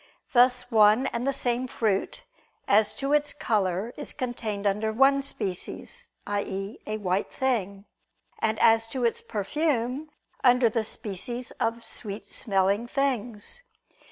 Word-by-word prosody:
Thus 245 0 +4
one 215 +3 +5
and 235 +3 -2
the - - +3
same 250 -2 0
fruit, 220 - -1 0.4
as 210 +1 +4
to 275 +1 -1
its 295 0 +2
color, 205 -1 -1
is 290 - -4
contained 230 -6 -3
under 210 +2 +1
one 270 +4 +4
species, 255 - -4 0.2
i.e. 200 0 -3
a 215 0 -2
white 190 -1 -1
thing: 205 -7 -1 0.5
and, 220 0 +1
as 225 0 +4
to 245 +1 -2
its 230 - 0
perfume, 260 +5 -1 0.3
under 250 -2 +5
the 225 0 -1
species 225 +4 -4
of 230 +1 -1
sweet 210 -2 -5
smelling 200 +2 +1
things. 250 - -2
230 Hz, 130 wpm, -27 LUFS, 205-255 Hz, 0.5 s, one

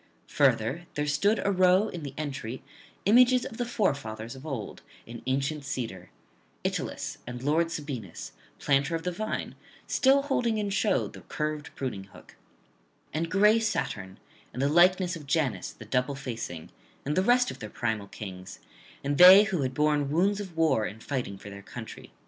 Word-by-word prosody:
Further, 135 +11 +1
there 150 - 0
stood 150 +10 +2
arow 185 +1 +4
in 175 - -7
the 140 -2 -7
entry 135 -5 -5 0.4
images 250 +4 +5
of 225 - -7
the 245 - -2
forefathers 120 - -2
of 135 +4 -10
old 125 -9 -5 0.2
in 115 0 -9
ancient 140 +3 -1
cedar, 115 -10 -5 0.5
Italus, - - -3
and 120 +1 -6
lord 160 +4 +2
Sabinus, 135 - -6 0.3
planter 140 +3 +1
of 165 - -4
the 180 - -1
vine, 215 +5 -4 0.3
still 275 +1 +3
holding 240 -5 0
in 205 -1 -2
show 210 +1 +1
the - - -12
curved 150 -1 -4
pruning 110 -8 -4
hook, 100 - -17 0.8
and 165 +2 -1
gray 210 +5 +5
Saturn, 95 - -2 0.3
and 125 - -8
the 140 +1 +2
likeness 180 +2 +4
of 150 -4 -10
Janus 140 -2 0
the 110 - -12
double 125 +5 0
facing, 115 -11 -6 0.3
and 145 +2 -1
the 185 - +3
rest 245 +4 +3
of - - -10
their 105 - -7
primal 110 -4 -2
kings, 95 -3 -8 0.5
and 140 0 -1
they 185 +3 +11
who 190 -7 -1
had 130 -1 -2
borne 150 -1 +2
wounds 195 +7 +2
of 190 -5 -8
war 135 -10 +2
in 110 - -9
fighting 120 -6 -4
for 100 - -10
their 100 0 -9
country. - - -9
145 Hz, 170 wpm, -28 LUFS, 120-185 Hz, 0.8 s, they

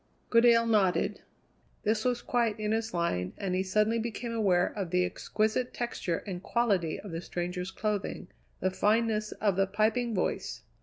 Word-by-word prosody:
Goodale 230 0 +6
nodded. 205 -5 +2 0.6
This 215 +1 +1
was 245 -1 0
quite 230 -3 0
in 210 0 -1
his 225 0 0
line, 95 - -1
and 190 -2 -2
he 185 - +1
suddenly 215 +4 +2
became 230 +1 -4
aware 190 -6 +3
of 195 -5 -3
the 180 +1 +2
exquisite 220 +6 -1
texture 210 -8 -2
and 180 -3 -5
quality 200 -8 +1
of 200 - -8
the 165 +1 -4
stranger's 180 +1 -4
clothing; 200 -1 -3 0.3
the 185 - +1
fineness 215 +1 +1
of 200 -4 0
the 195 0 +3
piping 220 +3 +1
voice. 120 - -2
210 Hz, 160 wpm, -30 LUFS, 180-225 Hz, 0.6 s, Goodale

